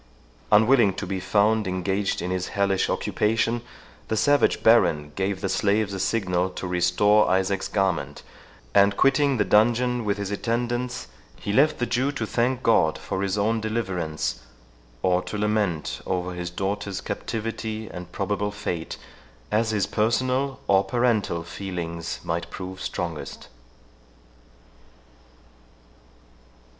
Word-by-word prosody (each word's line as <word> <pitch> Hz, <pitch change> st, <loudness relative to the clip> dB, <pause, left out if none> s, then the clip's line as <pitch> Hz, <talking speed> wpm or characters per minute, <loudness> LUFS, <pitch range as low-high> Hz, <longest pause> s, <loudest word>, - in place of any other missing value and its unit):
Unwilling 110 Hz, -1 st, +5 dB
to 100 Hz, -, -4 dB
be 95 Hz, 0 st, -3 dB
found 105 Hz, +2 st, +2 dB
engaged 95 Hz, +1 st, -1 dB
in 90 Hz, -, -2 dB
his 90 Hz, -1 st, -2 dB
hellish 100 Hz, -1 st, +1 dB
occupation, 115 Hz, +2 st, 0 dB, 0.5 s
the 110 Hz, -, -1 dB
savage 145 Hz, +5 st, +3 dB
Baron 85 Hz, -10 st, +4 dB
gave 95 Hz, 0 st, -1 dB
the -, -, -1 dB
slaves 100 Hz, +2 st, +1 dB
a 95 Hz, -, -4 dB
signal 95 Hz, -3 st, 0 dB
to 95 Hz, -, -6 dB
restore 90 Hz, +4 st, +3 dB
Isaac's 95 Hz, +1 st, +1 dB
garment, 85 Hz, -8 st, -1 dB, 0.5 s
and, 100 Hz, 0 st, +4 dB
quitting 135 Hz, 0 st, +3 dB
the 105 Hz, -, +2 dB
dungeon 120 Hz, +3 st, +3 dB
with 105 Hz, -1 st, 0 dB
his 100 Hz, -1 st, -4 dB
attendants, 120 Hz, +3 st, -2 dB, 0.3 s
he 100 Hz, -, -3 dB
left 145 Hz, +6 st, +4 dB
the 120 Hz, -, 0 dB
Jew 130 Hz, +4 st, 0 dB
to 120 Hz, -5 st, -2 dB
thank 120 Hz, +5 st, 0 dB
God 90 Hz, -9 st, +3 dB
for 95 Hz, -, -4 dB
his 100 Hz, 0 st, -1 dB
own 110 Hz, +2 st, +1 dB
deliverance, 90 Hz, -, -2 dB, 0.6 s
or 90 Hz, -1 st, +3 dB
to 105 Hz, -, -5 dB
lament 105 Hz, -6 st, -1 dB
over 90 Hz, -1 st, -2 dB
his 90 Hz, 0 st, -4 dB
daughter's 95 Hz, +2 st, -3 dB
captivity, 110 Hz, -1 st, -4 dB
and 90 Hz, -1 st, -9 dB
probable 100 Hz, +2 st, -1 dB
fate, 90 Hz, -5 st, -4 dB, 0.5 s
as 110 Hz, +1 st, +2 dB
his 105 Hz, -3 st, +1 dB
personal 130 Hz, +5 st, 0 dB
or 95 Hz, 0 st, +4 dB
parental 115 Hz, -9 st, 0 dB
feelings 85 Hz, -2 st, -5 dB
might 85 Hz, +1 st, -3 dB
prove 95 Hz, 0 st, -7 dB
strongest. -, -, -5 dB
100 Hz, 130 wpm, -25 LUFS, 90-115 Hz, 0.6 s, Unwilling